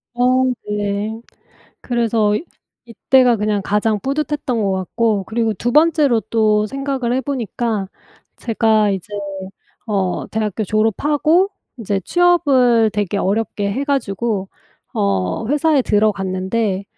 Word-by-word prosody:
어. 255 +1 +3 0.3
네. 210 +1 -2 0.6
그래서 225 -3 +1 0.5
이때가 245 +1 +3
그냥 210 -1 -1
가장 210 +1 0
뿌듯했던 280 -3 -2
것 195 -1 +1
같고 200 +2 0
그리고 225 0 -1
2 240 +6 -2
번째로 300 -6 +4
또 215 -2 +1
생각을 270 -1 -2
해 260 - +1
보니까 235 -5 -2 0.5
제가 220 -2 +2
이제 190 -1 -4 0.8
어 195 -4 -1
대학교 215 -1 -2
졸업하고 295 - +2 0.3
인제 200 -3 -2
취업을 265 - +3
되게 205 -1 -1
어렵게 205 0 -1
해 275 +5 -2
가지고 225 -7 -1 0.4
어 95 - -1
회사에 295 +2 +2
들어갔는데 200 -1 0
220 Hz, 240 characters per minute, -18 LUFS, 205-260 Hz, 0.8 s, 번째로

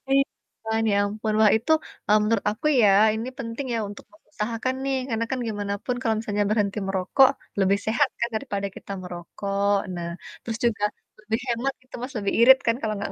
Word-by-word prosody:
Iya 275 0 +5 0.4
kan, 220 0 0
ya - - +2
ampun. 215 +1 -2
Wah, 215 -1 +7
itu, 230 +8 -2 0.4
e - - +2
menurut 220 0 +1
aku 215 - -9 0.2
ya, 210 - +6 0.3
ini 225 +3 -4
penting 235 +1 -5
ya 230 - 0
untuk 205 - -10
mengusahakan 250 -5 -4
nih, 275 0 0
karena 230 -1 0
kan 260 - -1
gimana 205 -2 -2
pun 250 - -1
kalau 225 -3 +1
misalnya 205 -2 -1
berhenti 210 -1 +1
merokok 195 +8 +4 0.3
lebih 195 +1 +3
sehat 240 +6 +3
kan, 235 - 0
daripada 205 -4 -2
kita - - -9
merokok. 195 +3 -2 0.2
Nah, 170 -1 -4 0.3
terus 225 -2 -4
juga 220 -3 0 0.4
lebih 220 +2 -1
hemat 240 +3 0
gitu 255 - -28
Mas, 255 +2 -5
lebih 200 -1 -1
irit 260 +3 +9
kan, 230 - +3
kalau 215 -1 -1
enggak 200 0 -4
220 Hz, 190 wpm, -25 LUFS, 200-240 Hz, 0.4 s, irit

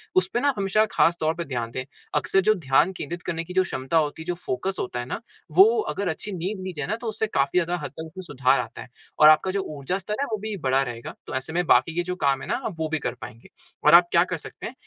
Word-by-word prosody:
उस 185 0 +4
पे 240 - +2
ना 285 +2 +2
हमेशा 200 +2 +2
ख़ास 165 +1 +3
तौर 160 +1 +1
से 170 - -2
ध्यान 120 -4 -3
दे 130 +2 -4 0.3
अक्सर 195 - +2
जो 215 +3 +4 0.2
ध्यान 150 +7 +5
केंद्रित 170 +4 -5
करने 165 -1 -2
कि 180 +2 -9
जो 185 0 +4
क्षमता 135 -2 -1
होते 155 0 0
है - - -8
जो 175 - -1
फ़ोकस 180 +3 -3
होता 125 -1 -3
है 120 - -4
ना 125 - -4 0.4
वो 190 +3 +10 0.2
अगर 195 +6 -2
अच्छी 185 +6 -5
नींद 190 +4 -3
ली 185 - -4
जाए 150 - -2
ना 215 - 0
तो 240 - -5
उससे 220 0 -1
काफ़ी 140 -5 0
ज़्यादा 175 0 -1
हद 140 - -5
तक 160 - -8
उसमे 175 +4 -9
सुधार 135 -4 +2
आता - - -6
है। - - -11 0.3
और 155 0 +9
आप 155 0 +7
का 190 - -1
जो 195 0 -1 0.2
ऊर्जा 140 +7 -2
स्तर 200 +2 -4
है - - +1
वो 215 - 0
भी 215 0 -4
बढ़ा 135 +1 +3
रहेगा। 120 -2 -6
तो - - -5
ऐसे 135 +4 -4
में 175 +1 +1
बाकि 145 +3 +4
के 175 - +1
जो 180 +1 -3
काम 135 -1 +2
है - - -7
ना 255 - -1 0.2
वो 160 -1 -1
भी 160 -1 -1
कर - - -3
पाएँगे। 115 -1 -10 0.4
और 150 - +7
आप 175 0 +8
क्या 170 +1 +5
कर 180 - -1
सकते - - -9
है 240 - -8
165 Hz, 285 wpm, -25 LUFS, 135-190 Hz, 0.4 s, वो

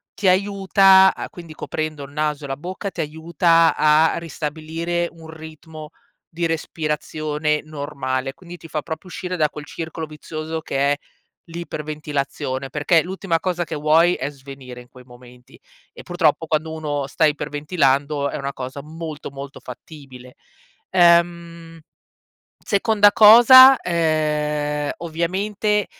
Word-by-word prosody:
ti 200 - -1
aiuta 195 0 +5
a - - -6
quindi 170 -3 -12
coprendo 155 -2 -5
il 140 - -11
naso 150 0 -2
e - - -6
la 135 - -3
bocca, 185 +6 -6
ti 170 - -4
aiuta 165 +2 +2
a 155 +1 +3
ristabilire 165 +2 -4
un 165 -1 -14
ritmo, 160 -1 -11 0.4
di 170 +1 -3
respirazione 155 -1 -2
normale, 140 -3 -4
quindi 175 -1 -12
ti 165 - -13
fa 155 -2 -4
proprio 160 +3 -7
uscire 180 +1 -5
da 155 -2 +2
quel 150 0 -10
circolo 160 +1 -6
vizioso 155 +1 -7
che 135 - -4
è, - - +2 0.5
l'iperventilazione, 150 -5 -5
perché 150 +4 +2
l'ultima 180 -1 -2
cosa 175 0 -2
che - - -8
vuoi 155 +4 +3
è 135 -3 -4
svenire 135 -3 -11
in 125 - -17
quei 125 0 -16
momenti. 125 0 -17 0.3
E - - -13
purtroppo, 170 -3 0
quando 155 0 -2
uno 145 -3 -3
sta 155 +3 +1
iperventilando 145 -1 0
è - - -5
una 140 0 -5
cosa 130 +2 -7
molto 155 -1 -8
molto 140 0 -9
fattibile. 125 -1 -12 0.5
Ehm, 170 -2 +2 0.8
seconda 205 0 +3
cosa: 240 +5 +9
ehm, 150 -3 -1
ovviamente, 195 +5 -1
155 Hz, 135 wpm, -21 LUFS, 145-170 Hz, 0.8 s, cosa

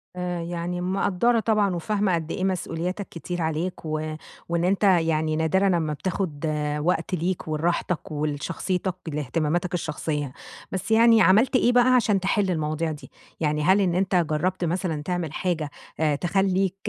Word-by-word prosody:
آآ، 180 -1 -3
يعني 175 +1 -3
مِقدّرة 195 +5 +1
طبعًا 210 -4 +1
وفاهمة 200 +1 0
قد 165 0 -4
إيه 185 - -3
مسؤولياتك 185 +1 -2
كتير 175 +1 -5
عليك 160 +2 -2
و 155 0 -3 0.3
وإن 170 0 0
أنت 195 +3 +1
يعني 160 -4 +3
نادرًا 175 +5 +2
أمّا 165 -5 +1
بتاخُد 165 -2 -3 0.3
وقت 170 +3 0
ليك 175 0 -2
ولراحتك 165 +1 -1
ولشخصيتك، 155 +5 -2
لإهتماماتك 155 +4 -1
الشخصية. 150 -4 -3 0.4
بس 190 +3 -4
يعني 225 0 +6
عملت 220 +8 +5
إيه 245 -1 +4
بقى 250 +1 +5
عشان 210 -5 +3
تحِل 195 0 +1
المواضيع 155 0 -1
دي؟ 150 - -9 0.3
يعني 150 -1 0
هل 190 +4 +4
إن 175 -2 +1
أنت 185 0 +1
جرّبت 175 +2 0
مثلًا 165 -3 -1
تعمل 170 -3 -3
حاجة 160 -5 -1 0.3
آآ 150 -2 +2
تخلّيك 190 +2 +1
175 Hz, 150 wpm, -25 LUFS, 155-190 Hz, 0.4 s, يعني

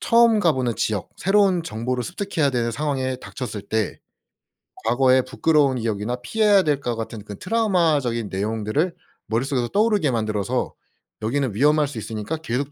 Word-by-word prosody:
처음 230 -1 +5
가보는 130 - +1
지역 105 -4 -1
새로운 195 -2 +3
정보를 125 -2 -3
습득해야 175 -5 -1
되는 120 -2 0
상황에 130 0 -2
닥쳤을 120 -5 -6
때 110 -2 -2 0.9
과거에 130 +3 +4
부끄러운 135 +1 +2
기억이나 110 0 -2
피해야 205 - +3
될 150 -4 +1
것 120 -4 -2
같은 110 -1 -6
그 105 -1 -9
트라우마적인 165 - +1
내용들을 110 - -1 0.3
머릿속에서 125 +2 0
떠오르게 205 - +2
만들어서 110 -4 -1 0.5
여기는 125 +2 -1
위험할 150 +6 +3
수 140 -4 -8
있으니까 110 +7 -4
계속 140 -2 -3
130 Hz, 380 characters per minute, -23 LUFS, 115-160 Hz, 0.9 s, 처음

